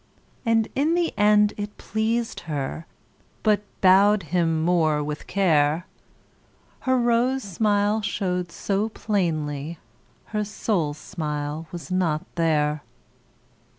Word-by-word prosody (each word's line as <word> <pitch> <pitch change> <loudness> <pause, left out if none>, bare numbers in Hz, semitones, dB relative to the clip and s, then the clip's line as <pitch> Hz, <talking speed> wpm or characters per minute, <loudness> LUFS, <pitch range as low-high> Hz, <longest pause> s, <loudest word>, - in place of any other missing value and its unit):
And 225 -1 +3
in 305 +5 +2
the 345 -1 0
end 210 0 +4
it 205 0 -5
pleased 225 +2 -1
her, 150 +2 -3 0.6
But 210 -2 +3 0.2
bowed 195 +2 +5
him 165 -3 0
more 160 -4 +2
with 150 0 -5
care. 165 -3 +2 1.0
Her 260 - +4
rose 240 +2 +2
smile 205 +2 +1
showed 180 -4 -2
so 200 +4 -1
plainly, 160 -8 -2 0.6
Her 210 0 +1
soul 200 -7 -1
smile 150 -2 -4
was 170 -4 -8
not 170 -4 0
there. 150 -3 +1
185 Hz, 110 wpm, -24 LUFS, 155-210 Hz, 1.0 s, bowed